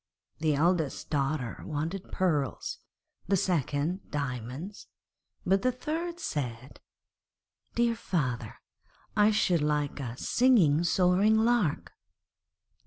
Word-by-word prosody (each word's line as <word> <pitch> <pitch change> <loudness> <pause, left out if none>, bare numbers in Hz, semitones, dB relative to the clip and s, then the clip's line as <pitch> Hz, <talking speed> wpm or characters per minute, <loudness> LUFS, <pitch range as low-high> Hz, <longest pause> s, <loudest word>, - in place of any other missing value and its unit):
The 155 -2 +2
eldest 160 -1 0
wanted 150 +5 -2
pearls, 155 -8 -1 0.5
the 195 +1 +3
second 170 +1 -1
diamonds, 140 - -5 0.6
but 195 +1 +3
the 255 - +2
third 330 +7 -4
said, 130 - -4 1.0
'Dear 235 0 +3
father, 125 - -2 0.6
I 210 0 +5
should 180 -6 +2
like 150 -1 0
a 125 -3 -5
singing, 185 - +4
soaring 185 +5 +3
lark.' 220 -8 +1
165 Hz, 95 wpm, -29 LUFS, 145-205 Hz, 1.0 s, I